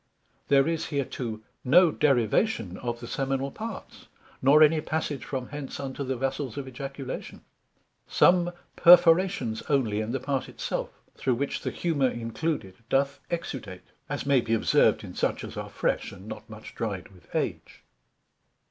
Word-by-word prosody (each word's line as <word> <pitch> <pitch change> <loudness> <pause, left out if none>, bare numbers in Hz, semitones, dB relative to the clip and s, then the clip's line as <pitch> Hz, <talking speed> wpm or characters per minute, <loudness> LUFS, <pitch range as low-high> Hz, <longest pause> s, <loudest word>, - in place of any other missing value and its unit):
There 135 +1 +4
is 165 0 -1
hereto 125 -6 -3 0.2
no 170 +6 +6
derivation 120 - +1
of 120 -1 -4
the 120 - -7
seminal 135 +1 -1
parts, 220 +3 -8 0.3
nor 145 +4 +7
any 155 +1 +4
passage 150 -5 -2
from 130 0 -4
hence, 145 -2 -6
unto 140 0 -4
the 130 0 -2
Vessels 135 0 -3
of 140 -2 -4
Ejaculation: 135 +1 -6 0.7
some 175 -1 +4 0.2
perforations 175 - +5
onely 115 -7 +1
in 110 +1 -3
the 135 - -1
part 135 -1 -2
it - - -16
self, - - -2 0.3
through 130 -2 0
which 140 +3 -2
the - - -2
humour 145 -7 +1
included 115 - -3
doth 140 +1 +1
exudate: 130 - -5 0.2
as - - -3
may 140 -3 +4
be 115 0 +1
observed 110 - +3
in - - -8
such - - -1
as - - -7
are - - -5
fresh, - - -1
and 95 +3 -12
not 110 0 -8
much 110 0 -10
dried 100 -6 -4
with 90 -2 -20
age. - - -3
135 Hz, 155 wpm, -27 LUFS, 115-150 Hz, 0.7 s, nor